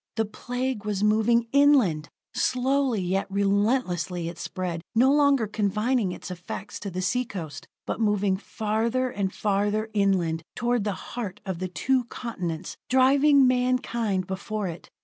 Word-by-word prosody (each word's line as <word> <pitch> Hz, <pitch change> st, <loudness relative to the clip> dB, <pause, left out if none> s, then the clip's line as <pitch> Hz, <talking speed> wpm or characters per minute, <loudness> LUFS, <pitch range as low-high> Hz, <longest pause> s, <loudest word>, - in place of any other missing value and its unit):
The 225 Hz, 0 st, +1 dB
Plague 245 Hz, +2 st, -4 dB
was 210 Hz, -2 st, -2 dB
moving 220 Hz, +2 st, +3 dB
inland! 255 Hz, -, +4 dB, 0.2 s
Slowly, 255 Hz, -3 st, +1 dB
yet 190 Hz, +2 st, 0 dB
relentlessly 195 Hz, -4 st, 0 dB
it 170 Hz, 0 st, -10 dB
spread, 180 Hz, -3 st, -4 dB
no 255 Hz, +4 st, +5 dB
longer 280 Hz, -5 st, +4 dB
confining 210 Hz, +1 st, 0 dB
its 185 Hz, -, -7 dB
effect 180 Hz, +3 st, -7 dB
to 200 Hz, -, -4 dB
the 185 Hz, 0 st, -4 dB
sea 250 Hz, +7 st, +1 dB
coast, 165 Hz, -11 st, -7 dB, 0.2 s
but -, -, -3 dB
moving 205 Hz, -2 st, +2 dB
farther 225 Hz, +5 st, -1 dB
and 195 Hz, -3 st, -2 dB
farther 210 Hz, +2 st, 0 dB
inland 185 Hz, -6 st, +1 dB
toward 240 Hz, -3 st, 0 dB
the 205 Hz, -, 0 dB, 0.2 s
heart 210 Hz, -5 st, -4 dB
of 190 Hz, -4 st, -4 dB
the 185 Hz, -, -2 dB
two 250 Hz, +7 st, 0 dB
continents, 180 Hz, -9 st, -5 dB
driving 275 Hz, +2 st, +5 dB
mankind 250 Hz, -6 st, +1 dB
before 200 Hz, +2 st, -3 dB
it. 170 Hz, -1 st, -8 dB
210 Hz, 145 wpm, -26 LUFS, 190-250 Hz, 0.2 s, no